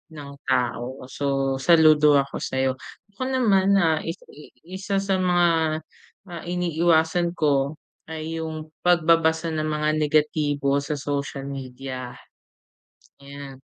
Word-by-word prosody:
ng 145 -2 -9 0.2
tao. 125 0 -1
So 135 -2 -1
saludo 155 -1 +5
ako 140 - -7
sayo. 130 0 -1 0.3
Ako 205 - -14
naman 200 -7 +3
na 165 -5 +3 0.6
isa 190 +3 -5
sa 195 -1 0
mga 175 -1 +3 0.8
ah, 170 -2 -7
iniiwasan 170 0 +1
ko 145 -2 +1 0.3
ay 160 0 -5
yung 155 -1 -6
pagbabasa 165 -1 +2
ng 155 -1 -2
mga 150 0 0
negatibo 150 -2 +1
sa 140 +2 -3
social 140 -1 -4
media, 130 -2 -7 1.1
yan. 140 -1 -10
155 Hz, 110 wpm, -24 LUFS, 140-170 Hz, 1.1 s, saludo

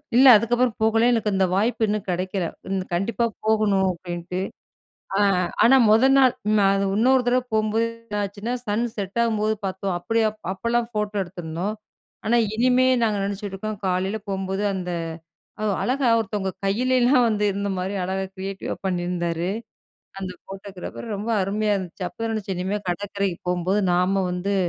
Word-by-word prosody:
இல்ல 260 +3 +7
அதுக்கப்பறம் 240 +2 +1
போகல. 225 +1 +3
எனக்கு 225 -3 +1
அந்த 190 0 +3
வாய்ப்பு 220 +4 +2
இன்னும் 210 0 -1
கெடைக்கல. 185 +1 -1 0.3
இந்த, 190 -1 0
கண்டிப்பா 195 +6 0 0.2
போகணும் 210 -3 +3
அப்டின்னுட்டு. 175 0 -5 0.8
அ, - - +2 0.4
ஆனா, 265 +3 +7
மொத 225 +5 +6
நாள் 260 -2 +5 0.2
நான் 195 0 +3
இன்னொரு 255 +4 +4
தடவ 250 +1 +3
போம்போது 220 +1 +2 0.2
என்ன 210 -3 -5
ஆச்சுன்னா, 205 +4 -4
சன் 210 +3 0
செட் 200 +1 -4
ஆகும்போது 220 -2 +1
பாத்தோம். 190 0 -2
அப்டியா 225 +4 +1 0.2
அப்பலாம் 235 +4 -1
போட்டோ 210 0 -1
எடுத்திருந்தோம். 175 +2 -4 0.5
ஆனா, 235 +2 +3 0.2
இனிமே 250 +2 +4 0.2
நாங்க 215 -2 +2
நெனச்சுட்டு 200 0 -4
இருக்கோம் 210 +1 -5
காலைல 190 +3 0
போம்போது 195 +1 -2
அந்த 180 -1 -4 0.7
ஒ, - - +1 0.2
அழகா 260 +1 +1
ஒருத்தவங்க 205 -3 -2 0.2
கையிலலாம் 250 +5 +3
வந்து 210 -2 0
இருந்த 200 +1 -2
மாரி 185 +2 -2
அழகா 190 +1 -2
கிரியேட்டிவ் 195 0 -5
வா - - -2
பண்ணிருந்தாரு. 175 -2 -1 0.7
அந்த 185 -1 -4 0.2
போட்டோகிராபர் 195 +1 -8
ரொம்ப 210 +3 -4
அருமையா 210 +2 0
இருந்துச்சி. 185 -1 -5
அப்பதான் 225 +4 -4
நெனச்சேன் 200 -3 -3
இனிமே 190 +3 -1
கடற்கரைக்கு 195 0 -2
போம்போது 180 +3 +1
நாம 185 +2 +2
வந்து, 185 +3 -1
200 Hz, 150 wpm, -23 LUFS, 190-225 Hz, 0.8 s, இல்ல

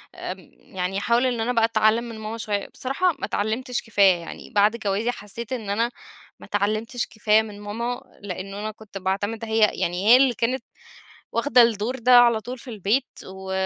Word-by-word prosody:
آمم، - - -7
يعني 185 +1 -5
أحاول 235 +5 +2
إن 245 -2 0
أنا 235 +2 0
بقى 230 -2 +4
أتعلِّم 220 0 +2
من 230 -2 -8
ماما 220 +1 -5
شوية. 205 -3 -2
بصراحة 310 +8 0
ما - - -2
اتعلِّمتش 235 +4 -2
كفاية، 200 -5 +4
يعني 170 - -9
بعد 210 +2 +3
جوازي 220 +2 -1
حسّيت 230 +3 -7
إن 220 -5 -5
أنا 230 +4 0 0.5
ما - - -12
اتعلِّمتش 215 +4 -1
كفاية 215 -1 +3
من 210 -2 -9
ماما، 235 +5 -4 0.2
لأن 195 0 -6
أنا 210 +2 -4
كنت 215 -2 -11
باعتمِد 200 +4 -2
هي 220 0 0
يعني 180 +3 -2
هي 240 +3 +9
اللي 260 -1 +4
كانت 245 +3 -1 0.7
واخدة 245 +1 +5
الدور 230 +2 +1
ده 245 +1 +6
على 235 -2 +5
طول 250 +4 -7
في 250 - -9
البيت، 220 +5 0 0.2
و 190 0 -7
220 Hz, 185 wpm, -24 LUFS, 205-240 Hz, 0.7 s, هي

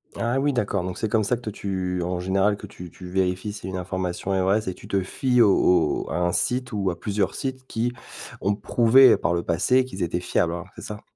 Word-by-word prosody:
Ah 120 +3 0
oui, 145 +1 +1
d'accord. 105 -6 -1
Donc, 90 0 -5
c'est 110 - -2
comme 110 +1 +2
ça 125 - +1
que 120 - -10
toi, 110 - -5
tu 95 -3 -3
en 90 +1 -2
général, 95 +3 +1
que - - -9
tu 90 -1 -10
tu 90 - -12
vérifies 95 +2 -1
si 105 - -8
une 95 - -5
information 90 +1 -3
est 95 - +1
vraie, 95 +4 +2
c'est 95 -3 -4
tu - - -14
te 100 - 0
fies 125 +6 +1
au 90 -6 +3
au - - -8
à - - -2
un 90 0 +1
site 125 +6 0
ou 100 -3 -1
à 85 -1 -5
plusieurs 100 -2 -1
sites 130 -1 -5
qui 120 +1 -1 0.5
ont 100 +2 +1
prouvé, 125 +5 +5
par - - 0
le 85 0 -1
passé, 125 +10 +2
qu'ils 95 -7 -5
étaient 85 +1 -1
fiables, 85 -1 0
hein, 85 0 -5
c'est - - -10
ça? 105 -2 -7
95 Hz, 245 wpm, -24 LUFS, 90-115 Hz, 0.5 s, prouvé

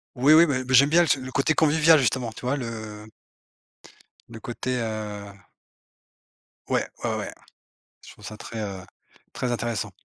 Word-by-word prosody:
Oui, 135 +5 +5
oui, 165 +2 +8
ben 135 -5 -1
ben, 130 +1 -3
j'aime 140 +3 +6
bien 170 +2 +5
ce 145 - +2
le 130 0 -8
côté 140 +4 +1
convivial, 160 +1 +5
justement, 125 -2 0
tu - - -11
vois? 130 +3 +1
Le 110 -4 -7 1.2
le 110 - -10
côté, 125 +3 -4
heu. 105 -2 -5 1.4
Ouais, - - 0 0.2
ouais, - - -1
ouais, - - -5 0.7
je - - -12
trouve - - -18
ça 110 - -8
très, 110 +1 -7
heu, 95 -3 -6 0.5
très 125 - -3
intéressant. 120 -3 -2
125 Hz, 160 wpm, -25 LUFS, 110-140 Hz, 1.4 s, oui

